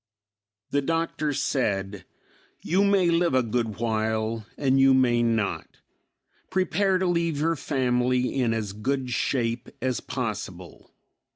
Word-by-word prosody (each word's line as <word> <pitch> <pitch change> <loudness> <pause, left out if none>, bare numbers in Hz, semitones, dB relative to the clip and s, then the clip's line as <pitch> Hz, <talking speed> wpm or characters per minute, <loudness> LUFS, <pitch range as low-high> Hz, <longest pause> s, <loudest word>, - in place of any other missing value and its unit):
The 145 - +2
Doctor 165 0 -1
said, 100 -9 -1 0.6
"You 190 +4 +2
may 195 -4 +3
live 170 -4 +2
a 130 - +3
good 115 -3 -2
while, 110 0 -1
and 135 -1 +2
you 135 0 +6
may 120 -2 +3
not. 115 -4 -1 0.7
Prepare 190 +1 +1
to 185 - -1
leave 170 -4 0
your 165 +2 +1
family 125 -3 0
in 120 -2 +2
as 110 -3 -2
good 130 +4 -2
shape 120 -1 -1
as 130 -2 -1
possible. 105 -8 -6
125 Hz, 125 wpm, -26 LUFS, 115-150 Hz, 0.7 s, you